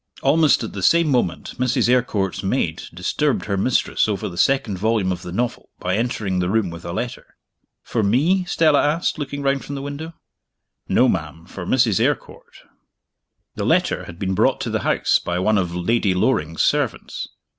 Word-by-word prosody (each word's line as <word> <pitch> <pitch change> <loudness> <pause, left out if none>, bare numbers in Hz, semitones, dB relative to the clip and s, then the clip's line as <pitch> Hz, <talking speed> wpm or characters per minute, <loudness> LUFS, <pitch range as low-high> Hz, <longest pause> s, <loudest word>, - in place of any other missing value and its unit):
Almost 150 -1 +4
at 115 - -6
the 100 - -5
same 170 - +4
moment 90 - -1
Mrs. 125 -1 +2
Eyrecourt's 105 -7 +1
maid 95 -5 -1
disturbed 120 - -1
her 100 - -1
mistress 110 +4 +1
over 100 -3 -2
the 85 - -8
second 105 -1 +1
volume 110 -2 +1
of 90 - -4
the 90 - -7
novel 120 +6 -3
by 90 +1 -1
entering 105 -5 -1
the 90 0 0
room 105 -3 +1
with 85 0 -9
a - - -4
letter. 120 +7 -5 0.5
"For 115 - -1
me?" 145 - +2
Stella 155 -4 +3
asked, 155 +2 0
looking 145 0 -4
round 135 0 +1
from 145 - -6
the 135 - -5
window. 150 +4 -6 0.7
"No, - - +4
ma'am 80 +1 -3
for 90 -1 -8
Mrs. 115 -7 +3
Eyrecourt." - - -3 0.9
The - - -4
letter - - +1
had 85 - -10
been 95 0 -2
brought - - +2
to - - -3
the - - 0
house - - +2
by 90 0 -3
one 105 +3 +2
of 90 -2 -2
Lady 95 +2 +1
Loring's 85 -6 +1
servants. - - -1
110 Hz, 180 wpm, -21 LUFS, 90-135 Hz, 0.9 s, Almost